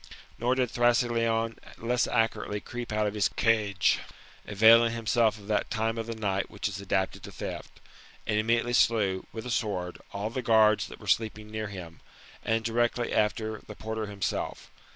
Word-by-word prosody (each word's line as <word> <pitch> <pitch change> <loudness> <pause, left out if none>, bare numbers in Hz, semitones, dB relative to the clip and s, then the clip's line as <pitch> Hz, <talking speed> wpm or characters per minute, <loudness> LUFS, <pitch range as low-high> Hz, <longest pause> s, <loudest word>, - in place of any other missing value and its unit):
Nor 125 +2 +2
did 125 -3 0
Thrasyleon 115 -2 +2 0.2
less 120 +1 0
accurately 115 -2 0
creep 120 +2 -7
out 105 0 +1
of 105 - -1
his 105 -1 +2
cage, 105 -4 +2 0.5
avaiKflg 110 +3 +6
himself 115 -1 +1
of 100 - -13
that 105 -1 0
time 115 0 -1
of 115 - -4
the 115 - -4
night 100 -3 -1
which 105 - -3
is 100 -1 -5
adapted 95 -1 -1
to - - -9
theft - - -6
j - - -21 0.4
and 105 - +1
immediately 115 +2 +1
slew, 105 -6 +2
with 110 0 -7
a 125 - -4
sword, 95 -7 -2
all 105 +2 -3
the 130 - -3
guards 110 -2 +4
that - - -11
were - - -12
sleeping 110 -1 0
near 110 0 -3
him, 90 -5 -9 0.4
and, 115 0 0
directly 120 +1 0
after 110 0 0
the 105 - -8
porter 110 0 -4
himself. 100 -2 -4
110 Hz, 175 wpm, -28 LUFS, 105-115 Hz, 0.5 s, avaiKflg